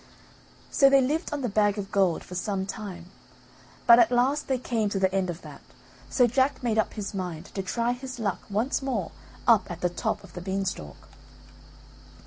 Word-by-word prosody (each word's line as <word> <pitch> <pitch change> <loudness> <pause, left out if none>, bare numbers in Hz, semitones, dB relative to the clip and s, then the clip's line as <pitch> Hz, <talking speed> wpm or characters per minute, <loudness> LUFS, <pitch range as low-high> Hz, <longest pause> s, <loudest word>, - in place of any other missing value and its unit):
So 275 - +6
they 275 0 +6
lived 295 +6 0
on 290 - -2
the 250 - 0
bag 205 -1 +2
of 195 -1 -5
gold 190 -5 +2
for - - -11
some 190 +1 -2
time, 190 -3 -7 0.7
but 235 0 +9
at 235 0 +5
last 260 +5 +2
they 265 - +1
came 230 -4 -1
to 200 - -2
the 190 -1 +1
end 190 -2 0
of 175 0 -6
that - - -11 0.5
so 250 - +4
Jack 260 +3 +1
made 225 -2 +1
up 220 - 0
his 210 -2 -4
mind 180 -3 -5
to 195 - -2
try 235 +5 -1
his 255 +1 -6
luck 205 -5 -1
once 220 +9 0
more 245 -10 -2 0.4
up 230 -4 +5
at 175 0 -7
the 180 - +2
top 210 +3 -2
of 195 - -14
the 175 - -7
beanstalk. 190 - -4
210 Hz, 195 wpm, -27 LUFS, 190-245 Hz, 0.7 s, but